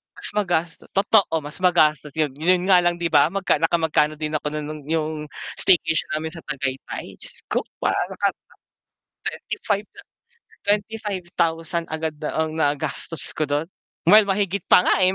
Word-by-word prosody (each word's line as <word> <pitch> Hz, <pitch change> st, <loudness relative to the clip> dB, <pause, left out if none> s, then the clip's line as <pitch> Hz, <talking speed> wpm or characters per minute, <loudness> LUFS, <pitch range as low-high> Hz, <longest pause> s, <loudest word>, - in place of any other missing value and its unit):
Mas -, -, -1 dB
magasto 175 Hz, -5 st, -1 dB
totoo, 195 Hz, -3 st, +3 dB
mas 145 Hz, 0 st, -8 dB
magastos 155 Hz, -5 st, +3 dB
yun, 150 Hz, -3 st, +1 dB
yun 180 Hz, +4 st, +2 dB
nga 180 Hz, -2 st, +6 dB
lang 175 Hz, 0 st, +1 dB
di 170 Hz, -, 0 dB
ba 150 Hz, -1 st, +5 dB
magka 195 Hz, +1 st, +1 dB
nakamagkano 160 Hz, -2 st, +2 dB
din 155 Hz, 0 st, -2 dB
ako 150 Hz, 0 st, -2 dB
no 155 Hz, -, -3 dB
nung 150 Hz, 0 st, -6 dB
yung 155 Hz, -1 st, -1 dB, 0.3 s
staycation 165 Hz, -3 st, +2 dB
namin 160 Hz, +1 st, -3 dB
sa 165 Hz, -, -9 dB
Tagaytay, 135 Hz, -2 st, -5 dB
Diyos -, -, -6 dB
ko -, -, 0 dB, 0.2 s
parang -, -, 0 dB
nakata -, -, -1 dB, 0.9 s
25 205 Hz, +1 st, -2 dB
na 405 Hz, -, -13 dB, 0.6 s
25,000 180 Hz, -6 st, -1 dB
agad 160 Hz, 0 st, -3 dB
na 150 Hz, -, -2 dB
ang 160 Hz, 0 st, 0 dB
nagastos 150 Hz, 0 st, -1 dB
ko 155 Hz, -, -1 dB
dun, 145 Hz, +2 st, 0 dB, 0.4 s
well, 210 Hz, +5 st, +8 dB
mahigit 200 Hz, -1 st, 0 dB
pa -, -, +7 dB
nga -, -, +3 dB
eh. 185 Hz, 0 st, +4 dB
165 Hz, 160 wpm, -23 LUFS, 155-185 Hz, 0.9 s, well